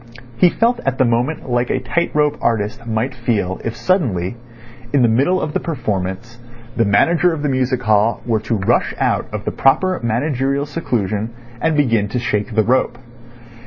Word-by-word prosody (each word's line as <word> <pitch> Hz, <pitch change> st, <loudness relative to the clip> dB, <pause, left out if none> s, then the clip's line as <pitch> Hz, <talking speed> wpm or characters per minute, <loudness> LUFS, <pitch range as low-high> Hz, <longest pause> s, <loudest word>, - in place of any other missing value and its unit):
He 175 Hz, +9 st, +5 dB
felt 235 Hz, +6 st, +1 dB
at 135 Hz, -1 st, -1 dB
the 130 Hz, -, +3 dB
moment 120 Hz, +7 st, -1 dB
like 120 Hz, -1 st, 0 dB
a -, -, 0 dB
tight 150 Hz, +7 st, -1 dB
rope 150 Hz, -1 st, +2 dB
artist 115 Hz, +2 st, -1 dB
might 115 Hz, +4 st, -1 dB
feel 110 Hz, -7 st, -2 dB
if 115 Hz, -, -3 dB
suddenly, 115 Hz, -, 0 dB, 0.6 s
in 140 Hz, -3 st, +3 dB
the -, -, +5 dB
middle 135 Hz, +12 st, +2 dB
of 155 Hz, -3 st, -3 dB
the -, -, +1 dB
performance, 110 Hz, -, -4 dB, 0.4 s
the 115 Hz, -, +2 dB
manager 165 Hz, -, +3 dB
of 150 Hz, -2 st, -4 dB
the 145 Hz, -, +1 dB
Music 130 Hz, -1 st, 0 dB
Hall 110 Hz, +1 st, +2 dB
were 115 Hz, -2 st, +1 dB
to 110 Hz, +2 st, -2 dB
rush 95 Hz, -3 st, +1 dB
out -, -, 0 dB
of -, -, -5 dB
the -, -, -1 dB
proper 185 Hz, +7 st, +2 dB
managerial 135 Hz, +4 st, 0 dB
seclusion 110 Hz, -, -2 dB, 0.3 s
and 160 Hz, -2 st, +1 dB
begin 115 Hz, -8 st, +2 dB
to 105 Hz, -, -3 dB
shake 110 Hz, -2 st, -2 dB
the 110 Hz, -, +4 dB
rope. 125 Hz, +1 st, +1 dB
120 Hz, 180 wpm, -18 LUFS, 110-145 Hz, 0.6 s, He